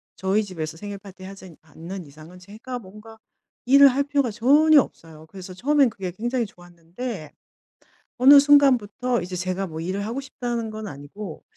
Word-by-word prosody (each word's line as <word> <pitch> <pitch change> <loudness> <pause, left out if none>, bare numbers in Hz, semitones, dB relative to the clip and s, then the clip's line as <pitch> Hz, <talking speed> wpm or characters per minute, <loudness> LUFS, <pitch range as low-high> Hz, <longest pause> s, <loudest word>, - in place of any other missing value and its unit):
저희 195 +3 0
집에서 160 -5 -6
생일 205 +1 -7
파티 195 -2 -14
하지 190 -3 -11
않는 165 +3 -9
이상은 155 +5 -14
제가 220 +7 -8
뭔가 215 +2 -14 0.5
일을 280 +2 +7
할 275 +2 0
필요가 280 -3 0
전혀 290 +7 +5
없어요. 160 -6 -12
그래서 185 0 -10
처음에는 275 +5 +2
그게 190 -3 -6
굉장히 240 +4 -2
좋았는데 175 - -9 0.9
어느 280 +3 +8
순간부터 255 -5 +3
이제 180 +1 -6
제가 185 +2 -3
뭐 160 -1 -8
일을 195 +4 -3
하고 235 +5 -4
싶다는 240 -4 -5
건 215 -1 -7
아니고 155 +6 -9
205 Hz, 360 characters per minute, -23 LUFS, 180-250 Hz, 0.9 s, 어느